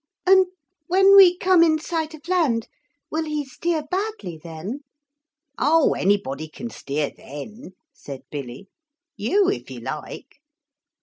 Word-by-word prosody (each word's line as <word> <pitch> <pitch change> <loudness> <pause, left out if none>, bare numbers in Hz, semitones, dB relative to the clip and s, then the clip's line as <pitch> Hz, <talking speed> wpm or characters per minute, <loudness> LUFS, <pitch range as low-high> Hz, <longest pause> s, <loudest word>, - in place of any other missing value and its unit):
'And 375 0 +6 0.4
when 385 +2 +6
we 365 -3 +8
come 370 -2 +4
in 320 -2 +4
sight 320 0 -3
of 310 +2 -16
land, 310 -12 +1 0.4
will 320 +1 -1
he 300 -1 -3
steer 315 +4 -2
badly 365 - -4
then?' 170 - -6 0.8
'Oh, 310 +3 +4
anybody 180 -6 0
can 235 +9 -8
steer 145 +1 -3
then,' 190 - -10 0.2
said 135 -2 -9
Billy; 140 +4 -7 0.5
'you 380 - +2
if - - -5
you - - -8
like.' - - -7
300 Hz, 130 wpm, -23 LUFS, -, 0.8 s, we